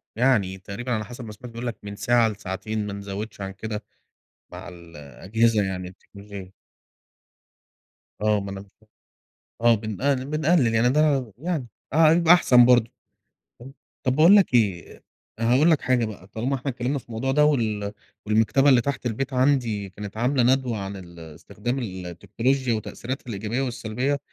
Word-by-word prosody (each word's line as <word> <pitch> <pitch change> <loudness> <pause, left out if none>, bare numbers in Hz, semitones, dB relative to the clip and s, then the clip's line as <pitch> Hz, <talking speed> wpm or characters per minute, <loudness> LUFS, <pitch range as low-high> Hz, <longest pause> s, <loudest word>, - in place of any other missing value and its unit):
يعني 110 -7 +2
تقريبًا 105 +6 -6
على 110 -2 -1
حسب 120 0 -9
ما 105 - -8
سمعت 115 +3 -11
بيقول 120 +1 -6
لك 120 - -4
من 100 0 -7
ساعة 120 0 +3
لساعتين، 105 +1 -4
ما 100 - -5
نزوِّدش 100 +1 -6
عن 95 0 -4
كده، 105 +1 -6 0.7
مع - - -9
ال 85 -2 -14
الأجهزة 105 - 0
يعني 90 -1 -4
التكنولوجية. 100 0 -12 1.7
آه، 105 -1 +2
ما 100 0 -6
أنا 95 0 -6
ك 100 - -16 0.9
آه، 120 0 +5
بنقل 125 +6 -1
بنقلِّل 155 -5 +2
يعني 115 +2 +3
ده 150 +3 +2
ع 135 -3 +1
يعني، 160 -5 -3 0.3
آه، 160 +1 +6
يبقى 170 +1 +6
أحسن 125 -8 +6
برضه، 120 -2 +4 0.7
فاهم، 135 +3 -12 0.3
طَب 130 -1 +1
باقول 170 +7 +7
لك 195 -9 +4
إيه، 100 -9 0 0.4
أ - - -2
هاقول 135 +8 +4
لك 155 - +2
حاجة 125 -2 +1
بقى، 100 -3 -9
طالما 125 +6 -2
إحنا 135 +1 -3
اتكلمنا 125 +3 -2
في - - -20
الموضوع 120 +4 -2
ده 150 +2 +4
وال 110 -8 0 0.3
والمكتبة 110 +6 +3
اللي 125 -3 +5
تحت 140 -1 -4
البيت 130 +4 -2
عندي 125 -7 +1
كانت 105 +2 -9
عاملة 125 +2 +1
ندوة 125 -2 +2
عن 100 0 -5
ال 85 -2 -12
استخدام 95 - -5
ال 95 -6 -6
التكنولوجيا 120 +9 -1
وتأثيراتها 125 +4 -5
الإيجابية 110 +4 -3
والسلبيّة، 125 +2 -2
115 Hz, 170 wpm, -24 LUFS, 100-130 Hz, 1.7 s, باقول